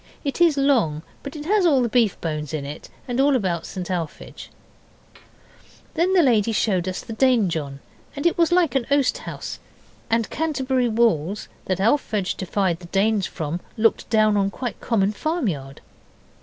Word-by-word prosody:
It 285 +3 -3
is 330 -4 +5
long, 235 - +2 0.2
but 280 +1 -8
it 300 -1 -7
has 410 +3 +3
all 285 -7 +4
the - - +1
beef 230 -4 +2
bones 155 -2 -3
in 145 -2 -4
it, 145 +2 -8 0.2
and 245 +1 0
all 280 0 +4
about 180 -8 -1
St 185 0 -5
Alphege. 170 -4 -5 1.4
Then 345 +3 +1
the 355 - +6
lady 230 -5 +3
showed 190 -5 +1
us 185 - -3
the 230 - -8
Danejohn, 180 - +1 0.3
and 285 - -5
it 345 - +3
was 335 -1 +2
like 350 -4 +3
an 265 -4 0
oast 280 -2 +2
house. - - -6 0.5
And 230 -1 +1
Canterbury 265 -6 0
walls 210 -5 +1 0.2
that 185 -1 -1
Alphege 215 -3 +1
defied 185 -2 -1
the 175 - -11
Danes 200 +1 +1
from 160 +2 -4 0.2
looked 225 0 +2
down 215 -2 +3
on 195 -1 +2
a - - -1
quite 245 +4 -6
common 205 -4 +1
farmyard. 205 - -3
220 Hz, 170 wpm, -23 LUFS, 180-275 Hz, 1.4 s, the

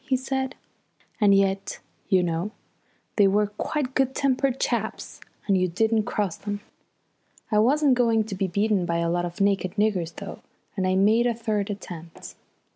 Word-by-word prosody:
he 265 -2 +1
said. 265 +1 -3 0.6
"And 205 -3 +5
yet, 195 0 +1 0.3
you 185 -3 +4
know, 170 +3 -1 0.7
they 205 -2 +6
were 205 +2 +3
quite 255 +6 -3
good 265 0 +1
tempered 270 -1 +1
chaps - - -2 0.3
when 200 - +2
you 185 -1 +2
didn't 220 +4 +1
cross 200 -5 -2
them. 205 0 -4 0.9
I 210 - +4
wasn't 280 +5 +4
going 230 -3 +3
to 210 -1 -7
be 195 0 -1
beaten 200 0 +1
by 170 - 0
a 170 0 0
lot 175 0 0
of 175 0 -7
naked 195 -2 +1
niggers 190 -6 0
though, 200 - -8 0.4
and 190 -2 0
I 185 - +2
made 215 +5 +4
a 235 - 0
third 215 -3 -2
attempt. 175 -5 -8
205 Hz, 170 wpm, -25 LUFS, 185-235 Hz, 0.9 s, they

